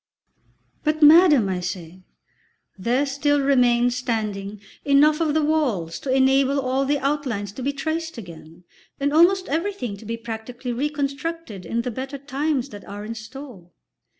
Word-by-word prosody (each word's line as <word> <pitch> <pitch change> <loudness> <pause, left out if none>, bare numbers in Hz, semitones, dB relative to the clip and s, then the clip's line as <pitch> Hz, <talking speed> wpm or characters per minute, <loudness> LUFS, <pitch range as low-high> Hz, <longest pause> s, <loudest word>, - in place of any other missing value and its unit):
"But, 305 0 +1
madam," 300 - +7
I 185 -1 -1
say, 180 0 -6 0.7
"there 240 +8 0
still 290 +1 +1
remains 245 -3 +3
standing 210 -5 -3 0.2
enough 295 +2 +4
of 310 -2 +1
the 315 - +2
walls 255 - 0
to 275 - -6
enable 270 +1 +3
all 265 +1 0
the 290 +2 +1
outlines 265 -8 -2
to 235 - -9
be 275 +3 0
traced 320 +3 -4
again, 170 -4 -11 0.4
and 285 +1 0
almost 365 +4 +4
everything 315 - -2
to 215 - -13
be 230 +2 -4
practically 235 +2 -6
reconstructed 280 - -3
in 235 +6 -1
the 250 - -3
better 265 +4 -5
times 280 0 -2
that 205 -5 -10
are 205 +1 -7
in 225 - -5
store." 230 -4 -10
265 Hz, 150 wpm, -23 LUFS, 220-290 Hz, 0.7 s, madam